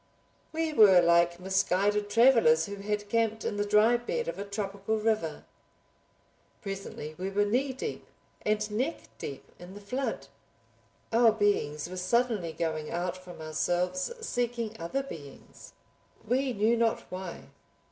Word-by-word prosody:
We 320 0 -1
were 205 -8 +8
like 170 0 +4
misguided 195 +2 +1
travelers 225 -9 +5
who 200 0 -7
had 205 +1 -3
camped 225 0 0
in 205 - -2
the 205 - +1
dry 210 +3 +5
bed 240 - -3
of 170 +3 -4
a - - -2
tropical 200 +1 -3
river. 215 -7 -1 1.2
Presently 195 -6 -6
we 190 +1 -2
were 205 +1 +1
knee 255 +6 +1
deep 260 - -6 0.3
and 215 0 0
neck 260 +10 -1 0.2
deep 140 - -6 0.2
in 180 +2 -11
the - - -8
flood. 250 +7 -3 0.9
Our 230 0 +6
beings 200 -9 0
were 185 +1 -7
suddenly 210 -2 +1
going 160 -2 -3
out 175 +1 -2
from 180 -3 -11
ourselves 175 - -1
seeking 240 - -2
other 170 +12 -2
beings—we 250 - -6
knew 220 +2 +2
not 230 -1 +1
why. 185 -1 -7
205 Hz, 135 wpm, -29 LUFS, 180-230 Hz, 1.2 s, were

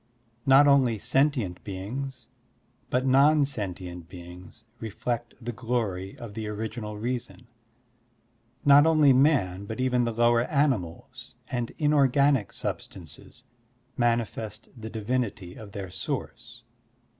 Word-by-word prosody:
Not 135 +2 +7
only 130 -5 +4
sentient 120 -4 0
beings, 120 +6 -6 0.6
but 130 +1 0
non 140 +3 +5
sentient 90 -9 -6
beings, 90 +4 -12 0.2
reflect 115 +2 -4
the 120 0 -5
glory 110 -6 -3
of 115 -3 -9
the 110 0 -5
Original 105 0 -5
Reason. 125 +2 -4 1.2
Not 145 +2 +7
only 155 -4 +5
man 125 - +2
but 110 +3 -6
even 125 -1 +2
the 120 - 0
lower 120 +1 +3
animals 130 - -2 0.2
and 120 -2 -2
inorganic 140 -5 +3
sub - - -3
stances - - -12 0.5
manifest 115 -2 -1
the 110 -2 -8
divinity 105 -4 -3
of 105 -2 -11
their 95 -3 -6
source. 120 +6 -6
120 Hz, 115 wpm, -27 LUFS, 105-130 Hz, 1.2 s, Not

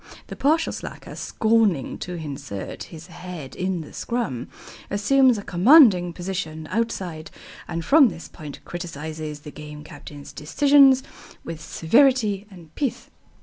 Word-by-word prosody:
The - - -6
partial 310 +4 +1
slacker, - - -8
scorning 220 - +1
to 180 - -5
insert 140 - -6
his 165 -1 -11
head 175 -5 -9
in 185 -2 -2
the 150 - -11
scrum, 230 - -3 0.4
assumes 250 +5 +4
a 205 - -6
commanding 190 - +6
position 170 -3 -5
outside 185 -8 -3 0.4
and 170 -1 -4
from 280 - +6
this 170 -3 -9
point 150 -2 -11
criticises 155 -3 -6
the 150 - -10
Game 150 0 -10
Captain's 145 -1 -11
decisions 275 - +5 0.4
with 165 -1 -7
severity 215 - +2
and 170 -5 -15
pith. 275 -5 -3
175 Hz, 130 wpm, -23 LUFS, 155-230 Hz, 0.4 s, commanding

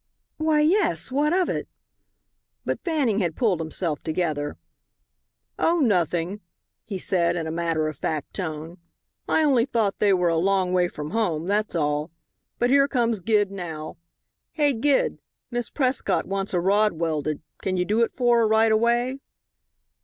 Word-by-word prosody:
"Why, 310 -1 +2
yes. 305 - +2
What 295 +3 +1
of 365 0 +2
it?" - - -3 1.0
But - - -3
Fanning 290 - +1
had 170 -5 -1
pulled 210 -9 +1
himself 160 -1 -2
together. 155 -3 -2 1.0
"Oh, 340 +1 +2
nothing," 180 - +1 0.4
he 200 -3 -5
said, 175 -2 +1
in 165 -2 -2
a 160 - -3
matter 165 -2 0
of 155 -3 -5
fact 150 -1 -3
tone. 165 -1 -5 0.5
"I 320 - +3
only 260 -6 +3
thought 225 -7 -1
they 205 - +4
were 180 -2 +2
a 165 - +1
long 190 0 +1
way 180 -1 +3
from 150 -3 -7
home, 175 -8 0
that's 205 +1 0
all. 150 0 0 0.5
But 245 +1 +1
here 275 0 +5
comes 235 -5 0
Gid 205 +1 +1
now. 165 -5 -6 0.6
Hey, 290 -3 +2
Gid! 270 +4 +1 0.3
Miss 240 -1 -3
Prescott 260 -2 0
wants 195 -1 -2
a - - +3
rod 205 +3 +3
welded. 155 -2 -2 0.2
Can 185 -1 -1
you 180 - +1
do 215 +5 +1
it 230 - +2
for 240 -2 +2
her 225 - +3
right 220 +1 +4
away?" 240 +4 +1
195 Hz, 160 wpm, -24 LUFS, 165-240 Hz, 1.0 s, here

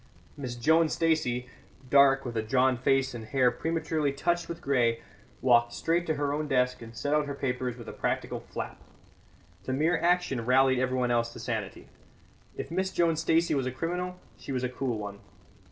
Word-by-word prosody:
Miss 130 -5 -5
Joan 160 +7 +3
Stacey, 155 -8 0 0.4
dark, 135 0 +5
with 120 -2 -5
a 110 - +1
drawn 130 +3 +2
face 135 +1 +1
and 120 -2 -6
hair 130 +1 +3
prematurely 160 0 -1
touched 170 +5 -1
with 170 0 -5
grey, 120 -6 +1 0.4
walked 120 -2 +4
straight 170 +1 0
to 155 - +1
her 145 -1 -1
own 150 +1 -2
desk 125 -2 +1
and 115 0 -10
set 145 - -1
out 150 -1 +2
her 140 - -4
papers 125 -2 -2
with 115 -2 -10
a - - -6
practical - - -2
flap. - - -7 0.8
The 130 - -2
mere 160 +5 +2
action 170 -8 +1
rallied 130 +1 +4
everyone 130 -1 0
else 115 -1 +1
to - - -9
sanity. - - -4 0.7
If - - -5
Miss 190 +2 0
Joan 170 -3 +2
Stacey 165 +1 +2
was 135 -3 0
a - - -2
criminal, 180 +6 -3 0.2
she - - -7
was 130 -1 -1
a 125 - 0
cool 125 -2 -2
one. 100 -1 -6
135 Hz, 185 wpm, -28 LUFS, 125-160 Hz, 0.8 s, dark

